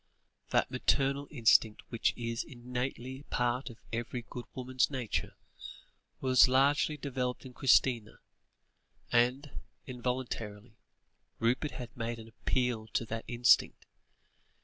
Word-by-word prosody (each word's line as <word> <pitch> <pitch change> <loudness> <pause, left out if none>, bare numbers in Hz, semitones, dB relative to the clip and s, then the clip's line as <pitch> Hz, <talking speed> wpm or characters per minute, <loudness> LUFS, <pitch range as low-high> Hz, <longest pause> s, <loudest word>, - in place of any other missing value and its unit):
That - - +2
maternal 140 +1 +1
instinct 115 -5 +3
which 115 - +1
is 115 -1 -2
innately 125 +1 -5
part 125 +2 0
of 115 - -11 0.2
every 120 +1 -3
good 125 -1 -7
woman's 130 0 +1
nature, 130 -6 -3 0.8
was 130 -1 +6
largely 140 +4 +3
developed 130 -3 -3
in 130 - -10
Christina, 125 -4 +3 0.9
and, 125 +4 +1 0.2
involuntarily, 120 -4 -4 0.6
Rupert 125 +6 0
had 125 -3 -8
made 115 0 -3
an 115 0 -11
appeal 120 -1 -1
to 115 - 0
that 115 +1 -5
instinct. 120 0 +3
125 Hz, 110 wpm, -31 LUFS, 115-130 Hz, 0.9 s, was